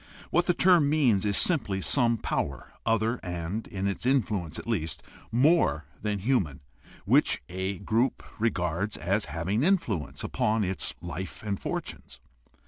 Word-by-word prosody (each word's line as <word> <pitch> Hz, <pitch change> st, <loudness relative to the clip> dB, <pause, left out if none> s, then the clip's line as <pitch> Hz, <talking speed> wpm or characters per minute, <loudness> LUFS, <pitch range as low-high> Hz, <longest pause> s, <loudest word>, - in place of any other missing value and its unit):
What 175 Hz, +1 st, +2 dB
the 180 Hz, -, +3 dB
term 175 Hz, -6 st, +5 dB
means 125 Hz, -10 st, +3 dB
is 100 Hz, -, +1 dB
simply 110 Hz, -, +3 dB
some 120 Hz, +3 st, +3 dB
power 70 Hz, -9 st, -3 dB
other 115 Hz, +1 st, +2 dB
and 90 Hz, +5 st, -4 dB
(in 95 Hz, -1 st, -4 dB
its 100 Hz, +3 st, -2 dB
influence 105 Hz, -, 0 dB
at -, -, -7 dB
least) 90 Hz, -9 st, -2 dB, 0.3 s
more 125 Hz, -, +3 dB, 0.2 s
than 105 Hz, -1 st, -1 dB
human 95 Hz, -, 0 dB, 0.4 s
which -, -, +3 dB
a 95 Hz, +2 st, -3 dB
group 115 Hz, +6 st, 0 dB, 0.2 s
regards 100 Hz, -2 st, -1 dB
as 100 Hz, +6 st, 0 dB
having 95 Hz, +7 st, -1 dB
influence 140 Hz, -, 0 dB
upon 110 Hz, 0 st, 0 dB
its 95 Hz, -1 st, -2 dB
life 85 Hz, +3 st, -6 dB
and 100 Hz, -2 st, -2 dB
fortunes. -, -, -5 dB
105 Hz, 140 wpm, -28 LUFS, 90-120 Hz, 0.4 s, term